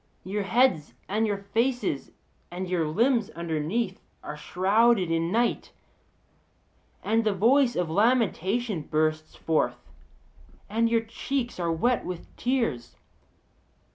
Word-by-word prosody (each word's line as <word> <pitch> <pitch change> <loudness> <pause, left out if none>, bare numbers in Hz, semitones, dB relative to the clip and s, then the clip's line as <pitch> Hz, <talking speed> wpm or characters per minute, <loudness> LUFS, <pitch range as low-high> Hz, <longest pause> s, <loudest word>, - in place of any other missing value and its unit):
Your 205 +3 -2
heads 200 - +2
and 215 +3 0
your 205 -1 -1
faces 220 - -1 0.4
and 180 +2 -5
your 175 -3 0
limbs 230 - +2
underneath 170 +6 -2 0.2
are 150 - -6
shrouded 190 +4 +2
in 165 +1 0
night; 235 +3 0 1.3
and 225 +1 +2
the 215 -2 +1
voice 245 +5 +4
of 180 - 0
lamentation 215 0 +1
bursts 155 +1 -1
forth, 160 -1 0 0.9
and 230 +3 +1
your 230 0 +2
cheeks 240 +1 -4
are 170 -1 0
wet 240 +10 +1
with 180 -2 -7
tears. 230 - -1
200 Hz, 115 wpm, -26 LUFS, 165-235 Hz, 1.3 s, voice